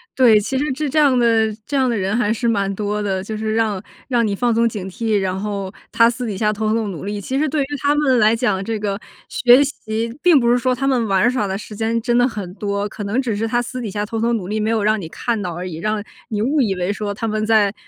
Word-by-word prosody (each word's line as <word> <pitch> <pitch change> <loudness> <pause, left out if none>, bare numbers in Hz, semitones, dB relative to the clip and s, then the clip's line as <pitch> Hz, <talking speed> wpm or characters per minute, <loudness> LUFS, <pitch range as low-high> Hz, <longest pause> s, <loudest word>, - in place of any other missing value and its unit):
对， 235 -5 +6
其 210 +6 -3
实 295 +2 0
这 300 +2 -2
这 305 +3 +1
样 275 -4 +4
的 225 -2 +3
这 290 - -4
样 260 -2 +2
的 235 - 0
人 195 +2 -1
还 225 -3 +1
是 235 +2 -1
蛮 200 -3 +1
多 210 +1 -2
的， 190 -2 -2
就 215 +2 -5
是 220 0 -2
让 215 -4 0 0.3
让 240 -3 +2
你 205 -2 -1
放 240 +2 +1
松 230 +1 +3
警 200 -4 -6
惕， 220 +2 -1
然 190 -1 -1
后 200 -1 -4 0.2
他 230 - +5
私 240 +1 -2
底 200 -3 -4
下 210 0 +1
偷 215 +1 -2
偷 225 -2 0
努 185 -1 -7
力， 205 0 -3
其 260 +7 -3
实 305 0 +1
对 295 -1 0
于 - - -3 0.2
他 290 0 +2
们 270 -4 +3
来 215 +1 +4
讲， 210 -5 0
这 225 +2 -2
个 205 -1 -2 0.3
学 250 +3 +5
习 230 -4 -4
并 350 -5 +6
不 235 -1 +2
是 245 - +4
说 255 +1 +1
他 270 +2 -1
们 245 -4 +1
玩 195 +4 +3
耍 235 -5 -1
的 190 0 -2
时 210 +1 -9
间 225 +2 0
真 240 +1 0
的 245 +1 +4
很 205 -7 -6
多， 200 0 -2
可 205 - -7
能 210 +6 0
只 240 -6 -1
是 225 +2 -1
他 240 +1 +1
私 250 +1 -4
底 225 - -4
下 205 +1 -2
偷 225 +2 -4
偷 235 +1 +1
努 205 -6 -2
力， 215 +2 -2
没 215 +1 0
有 225 -2 +1
让 215 0 +2
你 165 - -7
看 230 +4 -2
到 175 -3 -4
而 180 +2 -5
已， 165 -3 -6
让 215 +4 -2 0.2
你 215 -4 -3
误 285 +4 +2
以 200 -5 +1
为 180 +2 -1
说 205 -1 -4
他 220 +3 -3
们 215 0 -1
在 215 -2 +3
220 Hz, 305 characters per minute, -20 LUFS, 205-240 Hz, 0.3 s, 对